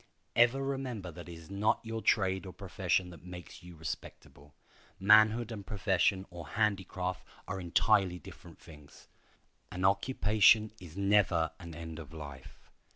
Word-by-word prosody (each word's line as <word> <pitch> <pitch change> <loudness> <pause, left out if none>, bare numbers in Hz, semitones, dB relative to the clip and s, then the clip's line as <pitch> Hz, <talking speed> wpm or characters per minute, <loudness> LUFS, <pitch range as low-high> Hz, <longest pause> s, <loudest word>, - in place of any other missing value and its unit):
Ever 120 +3 +4
remember 130 -9 -4
that 85 +1 -10
it - - -7
is 80 +2 -12
not 100 +2 +1
your 115 0 -4
trade 95 -3 +1
or 90 - -8
profession 95 -1 -1
that 85 - -13
makes 90 -1 -10
you 90 -1 -12
respectable. 75 -2 -8 0.4
Manhood 110 +3 +5
and 105 -3 -6
profession 95 -1 +1
or 85 -3 -8
handicraft 95 -1 -1 0.2
are 95 0 -4
entirely 95 +1 +2
different 80 - -13
things. 75 -3 -16 0.6
An 90 +1 -2
occupation 105 +1 +4
is 90 -1 -12
never 100 -5 +3
an 85 -3 -9
end 80 0 -7
of 80 -1 -10
life. 70 -4 -11
95 Hz, 145 wpm, -32 LUFS, 85-105 Hz, 0.6 s, Manhood